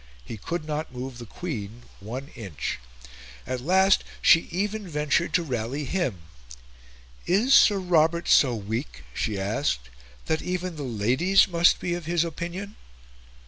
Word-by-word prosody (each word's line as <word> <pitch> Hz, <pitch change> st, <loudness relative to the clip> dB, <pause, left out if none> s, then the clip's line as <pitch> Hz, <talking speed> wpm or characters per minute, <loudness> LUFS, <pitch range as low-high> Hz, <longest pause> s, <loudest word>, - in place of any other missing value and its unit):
He -, -, -6 dB
could 155 Hz, -, -4 dB
not 155 Hz, -1 st, -3 dB
move 125 Hz, 0 st, -6 dB
the 120 Hz, -, -9 dB
Queen 120 Hz, -, -6 dB, 0.2 s
one 125 Hz, +8 st, -7 dB
inch. 95 Hz, -, -5 dB, 0.7 s
At 130 Hz, -1 st, -3 dB
last, 190 Hz, +6 st, +4 dB, 0.2 s
she 165 Hz, -, +5 dB
even 205 Hz, +3 st, -2 dB
ventured 150 Hz, +1 st, 0 dB
to 175 Hz, -, +3 dB
rally 130 Hz, +1 st, -3 dB
him. 130 Hz, -, -2 dB, 1.0 s
"Is 220 Hz, +9 st, +3 dB
Sir 205 Hz, -6 st, +7 dB
Robert 170 Hz, -2 st, +2 dB
so 125 Hz, -4 st, +5 dB
weak," 110 Hz, -, -5 dB
she 105 Hz, -, -2 dB
asked, 60 Hz, -, -1 dB, 0.3 s
"that 160 Hz, -, 0 dB
even 180 Hz, -1 st, -3 dB
the 150 Hz, -, -7 dB
Ladies 130 Hz, -, +3 dB
must 170 Hz, -1 st, +4 dB
be 175 Hz, -, -2 dB
of 175 Hz, -2 st, -4 dB
his 170 Hz, -1 st, +2 dB
opinion?" 175 Hz, +5 st, -6 dB
155 Hz, 145 wpm, -26 LUFS, 120-175 Hz, 1.0 s, Sir